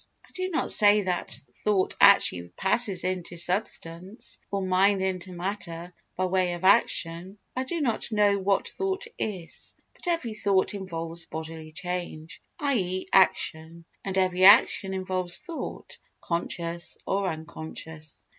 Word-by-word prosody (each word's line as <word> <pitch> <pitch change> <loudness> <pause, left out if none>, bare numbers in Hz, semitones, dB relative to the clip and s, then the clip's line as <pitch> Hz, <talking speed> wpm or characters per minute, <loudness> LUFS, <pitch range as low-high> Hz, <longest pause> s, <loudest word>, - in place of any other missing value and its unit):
I - - -26
do 370 0 -3
not 325 - 0
say 210 -1 +7
that 180 -2 -2 0.3
thought 200 -3 +1
actually 90 - +5
passes 195 -2 +2
into 180 -1 -4
substance, 180 +1 -2
or 200 -1 -2
mind 190 +1 +2
into 185 -1 -3
matter, 175 -1 -5 0.2
by 185 - -1
way 185 -1 0
of 175 +1 -7
action—I 190 +3 0
do 335 +5 -3
not 235 -4 0
know 205 -2 +2
what 195 +1 0
thought 390 +2 -2
is—but 190 - -7
every 330 -10 -1
thought 200 -3 +1
involves 165 -4 -3
bodily 160 0 -7
change, 175 -2 -6 0.2
i.e. 190 -11 -1
action, 170 -3 +2 0.2
and 195 -1 -3
every 185 -1 +1
action 195 -1 +6
involves 185 -2 0
thought, 335 -3 -8 0.2
conscious 170 0 -2
or 195 0 -1
unconscious. 160 -1 -7
185 Hz, 125 wpm, -26 LUFS, 170-200 Hz, 0.3 s, say